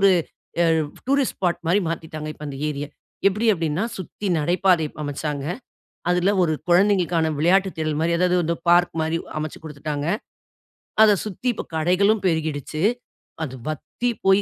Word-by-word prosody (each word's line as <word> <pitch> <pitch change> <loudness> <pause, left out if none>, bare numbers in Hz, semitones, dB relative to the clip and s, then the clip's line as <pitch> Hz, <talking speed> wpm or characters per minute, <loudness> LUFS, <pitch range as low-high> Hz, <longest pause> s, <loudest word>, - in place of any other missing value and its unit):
ஒரு 195 0 +6 1.0
tourist 275 -1 +2
spot 175 -2 0
மாதிரி 180 +5 +4
மாத்தீட்டாங்க. 155 -2 -4
இப்போது 150 0 -8
அந்த 135 - -6
ஏரிய. 145 0 -3 0.4
எப்படி 210 +4 0
அப்படின்னா 165 +1 -1
சுத்தி 190 +3 -6
நடைபாதை 175 +1 +3 0.2
அமைச்சாங்க. 145 0 -3 0.7
அதுல 180 +3 +3
ஒரு 165 -3 +2 0.2
குழந்தைங்களுக்கான 175 -3 +3
விளையாட்டு 190 +5 +3
திடல் 155 -1 -1
மாதிரி 170 +1 +2
அதாவது 175 -2 +2
பார்க் 175 0 +4
மாதிரி 160 +1 0 0.2
அமைச்சு 155 -1 -5
குடுத்துட்டாங்க. 150 -1 -4 1.0
அதை 210 -2 +6
சுத்தி 215 +5 -2
இப்பொ - - -6
கடைகளும் 190 +6 +3
பெருகிடுச்சு. 155 -1 -1 0.6
அது 130 - -7
வத்தி 240 - -3 0.2
போய் 195 +1 +6
170 Hz, 135 wpm, -23 LUFS, 155-190 Hz, 1.0 s, ஒரு